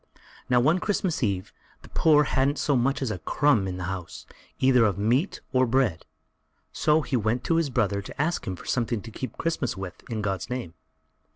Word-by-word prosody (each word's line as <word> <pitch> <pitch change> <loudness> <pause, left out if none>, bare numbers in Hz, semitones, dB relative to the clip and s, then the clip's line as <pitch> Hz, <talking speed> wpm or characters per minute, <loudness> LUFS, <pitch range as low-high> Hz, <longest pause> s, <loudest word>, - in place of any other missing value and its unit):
Now, 125 -1 +5
one 155 +9 +3
Christmas 190 -4 -1
eve, 100 -5 -1 0.3
the - - -14
poor 160 -2 +4
one 150 0 +5
hadn't 135 +2 +1
so 145 - +1
much 135 +3 +1
as 120 - -1
a 95 - -4
crumb 120 - +2
in 90 -1 -4
the 90 - -5
house, 90 -1 -6 0.3
either 130 -2 +4
of 105 -5 +2
meat 120 - +1
or 130 0 +3
bread, 115 -9 +1 0.7
so 155 +1 +2
he 135 - -2
went 115 +1 0
to 165 - +1
his 165 -4 +1
brother 105 -6 0
to 95 - -11
ask 160 +4 0
him 95 - -2
for - - -13
something 120 -4 -1
to 115 - -9
keep 130 - -6
Christmas 165 -10 -1
with, 95 -2 -7
in 110 -3 -3
God's 95 -1 -2
name. 125 -10 -4
125 Hz, 205 wpm, -26 LUFS, 100-140 Hz, 0.7 s, Now